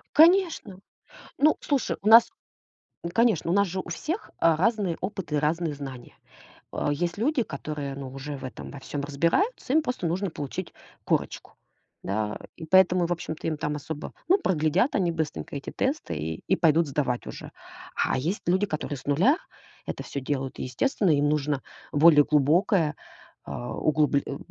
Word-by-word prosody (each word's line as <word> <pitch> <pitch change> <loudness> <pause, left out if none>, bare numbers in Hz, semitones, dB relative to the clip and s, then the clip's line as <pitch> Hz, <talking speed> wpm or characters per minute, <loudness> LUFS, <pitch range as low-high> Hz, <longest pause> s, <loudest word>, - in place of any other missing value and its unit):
Конечно. 325 - +4 0.6
Ну, 305 +2 +4
слушай, 280 -4 0
у 210 - +1
нас, 230 +1 +8 0.7
ну, 170 - -4
конечно, 225 -8 +2
у - - +2
нас 200 0 +4
же 185 +1 -3
у - - -9
всех, 315 - -4
а, 165 -1 +4
разные 195 -1 +1
опыты 185 -5 -3
и - - +3
разные 155 +1 0
знания. 135 -4 -9 0.6
А 145 - -1
есть 170 +5 -2
люди, 250 +3 +1
которые, 140 -4 -5
ну, 135 -2 -6
уже 140 +1 -6
в 135 - -11
этом 130 - -7
во 140 - -9
всём 140 +2 -5
разбираются, 170 - 0
им 315 - +5
просто 250 - -2
нужно 190 +4 -1
получить 145 -4 -6 0.3
корочку. - - -2 0.5
Да, 105 +1 -2 0.2
и 160 - -7
поэтому, 180 0 +4
в - - -5
общем-то, 160 -2 -5
им 160 - 0
там 150 0 -2
особо 150 +1 -6 0.2
Ну, 380 +4 +5
проглядят 180 - +1
они 175 -3 +2
быстренько 160 -2 -4
эти 140 - -5
тесты 275 - -2
и 80 +2 -5
и - - +3
пойдут 165 -1 +3
сдавать 135 -3 -1
уже. - - -8 0.4
А - - +1
есть 165 +10 -2
люди, 190 +3 +3
которые 150 -5 -4
с - - -14
нуля 185 - +3 0.5
это - - -5
всё 140 - -5
делают, 135 -1 -3
и, - - -3
естественно, 180 - +1
им 145 0 +3
нужно 145 -2 0 0.3
более 150 -1 +7
глубокое, 155 - +3 0.5
а, 120 +13 -5
углубл 150 -2 +2
э, 140 - -5
160 Hz, 175 wpm, -26 LUFS, 145-195 Hz, 0.7 s, нас